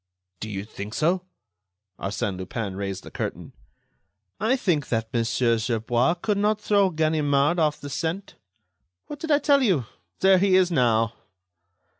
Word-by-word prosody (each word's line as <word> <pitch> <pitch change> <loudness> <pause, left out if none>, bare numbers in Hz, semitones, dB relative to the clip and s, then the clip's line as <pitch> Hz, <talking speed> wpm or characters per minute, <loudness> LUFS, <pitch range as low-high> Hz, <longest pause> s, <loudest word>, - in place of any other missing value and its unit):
"Do 110 - -5
you 100 -1 -5
think 105 0 -8
so?" 180 +3 +1 0.7
Arsène 100 0 -2
Lupin 95 +1 -4
raised 95 -1 -4
the - - -11
curtain. - - -5 0.9
"I 220 +6 +2
think 170 - 0
that 115 0 -2
Monsieur 115 0 +1
Gerbois 120 +5 +1
could 200 +3 -1
not 210 +1 +1
throw 200 -2 +3
Ganimard 155 -1 +1
off 150 -2 +1
the 145 - -8
scent.... 165 +7 -3 0.7
What 295 - -8
did 320 - -6
I 290 - +5
tell 285 -1 +3
you? 185 - +2 0.4
There 190 -1 +6
he 190 0 +3
is 185 -1 +4
now." 115 -6 +2
150 Hz, 150 wpm, -25 LUFS, 115-190 Hz, 0.9 s, There